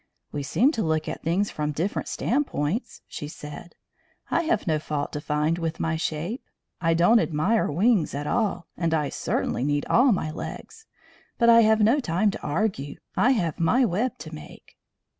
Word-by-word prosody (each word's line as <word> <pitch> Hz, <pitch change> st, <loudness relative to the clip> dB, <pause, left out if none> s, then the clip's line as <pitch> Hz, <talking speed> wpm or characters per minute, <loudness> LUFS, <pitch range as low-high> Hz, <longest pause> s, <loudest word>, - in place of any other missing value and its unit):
"We 145 Hz, -, -3 dB
seem 215 Hz, -, +2 dB
to 230 Hz, -, -2 dB
look 160 Hz, -3 st, 0 dB
at -, -, -5 dB
things 185 Hz, +5 st, 0 dB
from 150 Hz, 0 st, -2 dB
different 170 Hz, +8 st, -2 dB
standpoints," 235 Hz, -, -2 dB
she 150 Hz, -, -6 dB
said. 150 Hz, +3 st, -10 dB, 0.6 s
"I -, -, +3 dB
have 220 Hz, -9 st, 0 dB
no 155 Hz, -3 st, +1 dB
fault 150 Hz, -1 st, -3 dB
to 150 Hz, -, -4 dB
find 150 Hz, +3 st, 0 dB
with 165 Hz, -1 st, -3 dB
my 160 Hz, 0 st, 0 dB
shape. 160 Hz, -, -3 dB, 0.4 s
I 165 Hz, -1 st, +2 dB
don't 175 Hz, +8 st, +5 dB
admire 190 Hz, +6 st, +1 dB
wings 190 Hz, -, +2 dB
at 145 Hz, +1 st, -3 dB
all, 195 Hz, -3 st, 0 dB
and 165 Hz, -2 st, 0 dB
I 150 Hz, -3 st, 0 dB
certainly 125 Hz, -, -2 dB
need 145 Hz, +1 st, 0 dB
all 255 Hz, +2 st, +4 dB
my 170 Hz, -6 st, -1 dB
legs. 445 Hz, -, -8 dB, 0.5 s
But 235 Hz, -, +4 dB
I 230 Hz, -, +8 dB
have 220 Hz, 0 st, +4 dB
no 230 Hz, +7 st, +4 dB
time 200 Hz, -2 st, +1 dB
to -, -, -8 dB
argue. 145 Hz, -4 st, -2 dB, 0.2 s
I 255 Hz, -, +4 dB
have 170 Hz, -10 st, -1 dB
my 245 Hz, +10 st, +3 dB
web 225 Hz, +5 st, -1 dB
to -, -, -9 dB
make." 75 Hz, -1 st, -12 dB
170 Hz, 180 wpm, -25 LUFS, 150-220 Hz, 0.6 s, I